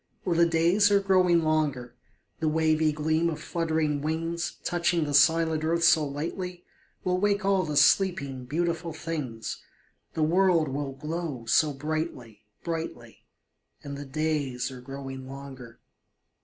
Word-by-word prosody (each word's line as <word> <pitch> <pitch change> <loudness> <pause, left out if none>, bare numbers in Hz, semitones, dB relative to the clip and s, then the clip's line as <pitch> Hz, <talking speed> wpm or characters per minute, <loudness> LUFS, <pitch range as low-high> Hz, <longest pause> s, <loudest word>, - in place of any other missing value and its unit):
Oh, 180 - +1
the 170 0 +4
days 170 +5 +3
are 200 -1 +4
growing 185 -3 +3
longer, 145 -6 -1 0.4
The 160 - 0
wavy 155 0 +2
gleam 155 +2 0
of 155 - -4
fluttering 160 -4 -1
wings, 165 +2 -2
Touching 175 -1 +1
the 145 - -3
silent 160 +1 +4
earth 165 +1 +1
so 160 -2 +5
lightly, 175 +5 -5 0.4
Will 180 0 0
wake 205 0 +1
all 195 -1 +3
the 150 -4 -2
sleeping, 140 -5 +2
beautiful 165 +3 -2
things, 150 -9 -5 0.5
The 160 - +1
world 170 -1 +3
will 135 0 -3
glow 150 -3 -5
so 150 +6 +3
brightly 135 -7 -5 0.2
brightly; 160 -9 -6 0.6
And 140 -1 -6
the 145 +1 -7
days 140 -3 -2
are 125 -1 -9
growing 135 0 -8
longer. 135 -3 -10
155 Hz, 140 wpm, -27 LUFS, 140-170 Hz, 0.6 s, so